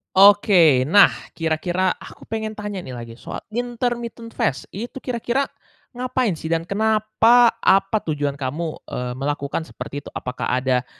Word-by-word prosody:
Oke, 185 -9 +6
nah, 200 +7 +7 0.2
kira-kira 175 +3 0
aku - - -13
pengen 220 -1 -3
tanya 210 -2 -5
nih 130 -8 -7
lagi 115 -1 -9
soal - - -7
intermittent 240 0 -3
fast, 135 - -1
itu 240 +6 -7
kira-kira 245 +1 -1 0.5
ngapain 250 -7 -1
sih 160 - -7
dan 165 0 0
kenapa, 220 +4 +4
apa 195 +3 +3
tujuan 145 -2 -2
kamu, 155 +4 -3
eee, 125 0 -4
melakukan 145 +2 -2
seperti 145 -3 -8
itu? - - -7
Apakah 125 0 -4 0.2
ada 125 -1 +1
190 Hz, 140 wpm, -22 LUFS, 145-225 Hz, 0.5 s, nah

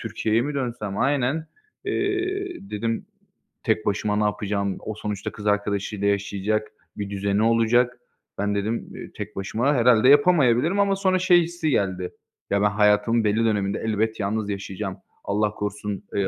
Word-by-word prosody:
Türkiye'ye 115 +1 0
mi 145 +2 -3
dönsem?" 115 -7 -3
Aynen. 140 +3 +1 0.4
Eee, 375 - -2
dedim 115 +2 -2 0.6
tek 110 - +1
başıma 105 +1 0
ne 105 - +1
yapacağım? 100 -1 -1
O 110 - -5
sonuçta 105 -2 -4
kız 105 - -7
arkadaşıyla 105 0 0
yaşayacak, 100 +1 0 0.3
bir 100 -1 -4
düzeni 100 +1 0
olacak. 115 +2 +3 0.4
"Ben" 105 0 0
dedim, 110 +3 -2
eee, - - -9
"Tek - - -6
başıma 115 +9 0
herhâlde 120 0 +5
yapamayabilirim." 145 +2 +4
ama 200 -1 +3
sonra 190 -1 +1
şey 180 -1 +5
hissi 170 -1 -2
geldi. 95 -7 0 0.4
Ya, 100 0 +1
ben 105 - +4
hayatımın 105 +2 +3
belli 110 +2 +2
döneminde 100 -3 0
elbet 110 +1 0
yalnız 105 +1 -1
yaşayacağım. 100 -1 -4 0.3
Allah 105 +1 0
korusun, 105 -1 -4
eee, 100 -1 +1
110 Hz, 150 wpm, -24 LUFS, 100-125 Hz, 0.6 s, herhâlde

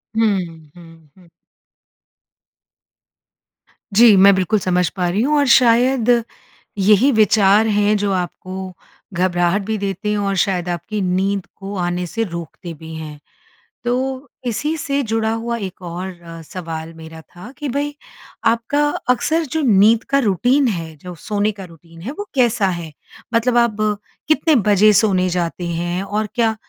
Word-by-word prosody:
हुँ, 215 -3 +2 0.4
हुँ, 165 -3 -16
हुँ। 180 -2 -20 2.6
जी 225 -1 +7
मैं 200 +1 +7
बिल्कुल 190 +3 +1
समझ 180 -2 +1
पा 180 -2 -2
रही 200 +5 0
हूँ 295 +4 +2
और 285 - +3
शायद, 245 0 +4 0.7
यही 210 +7 +4
विचार 215 -1 +4
है 210 0 +2
जो 205 -1 0
आपको 185 +1 -5 0.4
घबराहट 175 +1 +1
भी 220 0 -2
देते 200 0 -3
हैं 210 - 0
और 200 -1 -1
शायद 180 -3 -2
आपकी 190 +5 -3
नींद 190 +1 0
को 200 +1 -7
आने 175 0 -2
से 225 +6 -2
रोकते 170 -2 -7
भी 160 +1 -11
हैं। 155 -2 -8 0.6
तो, 260 +3 -2 0.2
इसी 290 +7 -1
से 280 -1 -1
जुड़ा 225 -1 -1
हुआ 235 +1 -3
एक 190 -3 -7
और 175 +1 -7
अ, 165 -1 -10
सवाल 165 -1 -7
मेरा 160 0 -11
था 180 +8 -13
कि 290 -1 -4
भई, 290 +3 -2 0.5
आपका 235 +6 +1 0.2
अक्सर 315 +6 +1
जो 320 - +1
नींद 220 -2 +4
का 275 - +3
रूटीन 250 +5 +2
है, 165 -7 -4
जो 180 +3 -9
सोने 210 +5 -1
का 195 -2 -10
रूटीन 165 0 -16
है 225 +10 -5
वो 410 - -5
कैसा 240 -5 +2
है? 170 -3 -4 0.4
मतलब 235 +1 +2
आप 230 -3 +2 0.5
कितने 310 +1 +3
बजे 205 +1 +5
सोने 190 -3 +3
जाते 175 0 -2
हैं 175 +2 -2
और 210 +2 -2
क्या 225 -2 +1
200 Hz, 155 wpm, -19 LUFS, 175-230 Hz, 2.6 s, जी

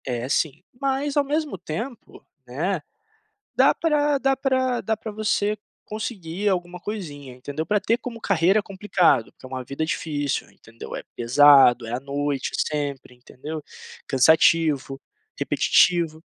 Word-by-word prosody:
É 125 -1 -3
sim, 155 +3 -1 0.2
mas 275 +1 -1
ao 290 - +4
mesmo 295 -4 -2
tempo, 225 - -7 0.2
né, 160 +8 -2 0.7
dá - - +5
pra 295 -3 +1
dá 270 0 +1
pra 260 -2 0
dá 220 +2 -1
pra 220 - -7
você 210 0 0 0.3
conseguir 205 -3 -3
alguma 180 -1 -2
coisinha, 150 -11 -7
entendeu. 145 +5 -5
Pra 210 +3 +1
ter 225 +3 +1
como 240 -3 -7
carreira 195 0 +3
é - - -1
complicado, 190 - +1
que - - -16
é - - -7
uma 130 0 -5
vida 140 +5 -3
difícil, 145 -3 -2
entendeu, 115 0 -12
é - - -6
pesado, 125 -1 +6
é 115 - -5
à 120 - -1
noite 140 0 -2
sempre, 145 -4 -3
entendeu, 145 +5 -8 0.4
cansativo, 150 0 +3 0.4
repetitivo. 170 -4 +2
165 Hz, 145 wpm, -23 LUFS, 140-215 Hz, 0.7 s, pesado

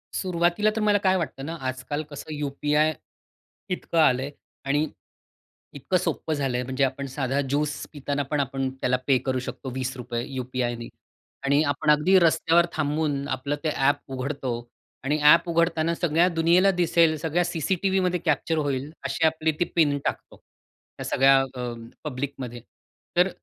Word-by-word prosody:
सुरुवातीला 175 +3 +1
तर 220 - -1
मला 210 -1 +4
काय 185 0 +4
वाटतं 135 -5 -4
ना 165 +2 -4
आजकाल 130 +4 -3
कसं 150 +1 -7
यूपीआय 150 +2 +1 0.8
इतकं 175 -2 -1
आलंय. 135 -1 +3 0.3
आणि 145 +3 +1 0.9
इतकं 165 +6 0
सोपं 165 -2 -2
झालंय 135 -4 -1
म्हणजे 130 +2 -1
आपण 135 +1 -1
साधा 135 +1 -1
ज्यूस 145 +2 -1
पिताना 145 0 -2
पण 150 - +1
आपण 135 -1 -1
त्याला 125 0 +2
पे 135 -2 +5
करू 130 -1 0
शकतो 130 +1 -6
₹20 125 -2 -3
यूपीआयनी 125 -3 -3 0.6
आणि 140 +2 +3
आपण 145 0 -1
अगदी 175 +6 +5
रस्त्यावर 170 0 +4
थांबून 145 -2 -1
आपलं 135 +3 -2
ते 160 - +1
ॲप 145 +2 +2
उघडतो 130 0 -3 0.5
आणि 145 +3 +1
ॲप 165 +3 +6
उघडताना 165 0 +2
सगळ्या 170 +1 +2
दुनियेला 170 +4 +4
दिसेल 170 -3 +3
सगळ्या 165 +3 0
सीसीटीव्हीमध्ये 180 +2 0
कॅप्चर 160 - +1
होईल 145 -1 -1
अशी 165 - 0
आपली 160 0 +1
ती 175 - +3
पिन 145 -4 +3
टाकतो. - - -3 0.6
त्या - - -6
सगळ्या 135 +1 +5 0.2
अ, 125 -1 -4 0.3
पब्लिकमध्ये 130 -4 -5 0.6
तर 180 +2 +5
145 Hz, 145 wpm, -25 LUFS, 135-165 Hz, 0.9 s, ॲप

